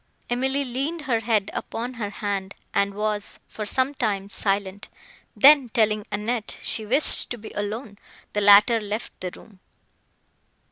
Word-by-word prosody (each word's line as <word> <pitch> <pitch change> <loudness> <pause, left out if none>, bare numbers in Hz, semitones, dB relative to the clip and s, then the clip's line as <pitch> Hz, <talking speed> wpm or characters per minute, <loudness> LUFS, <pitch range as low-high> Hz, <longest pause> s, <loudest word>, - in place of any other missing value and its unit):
Emily 265 +3 +1
leaned 275 +7 -2
her 255 -6 0
head 220 -3 0
upon 240 +3 -4
her 220 -4 -4
hand, 200 -1 -4 0.2
and 200 0 +1
was, 210 0 -3
for 215 -1 -6
some 260 +5 +1
time, 200 -7 -2
silent; 200 -1 -2 0.5
then, 280 -3 +7
telling 215 -2 +1
Annette 215 +2 -3
she 215 -1 -3
wished 270 +7 +2
to 245 - -4
be 220 -1 -10
alone, 205 +1 -5 0.3
the 210 - 0
latter 205 +3 +7
left 210 +2 -4
the 185 - -3
room. 200 -4 -17
215 Hz, 145 wpm, -24 LUFS, 205-245 Hz, 0.5 s, then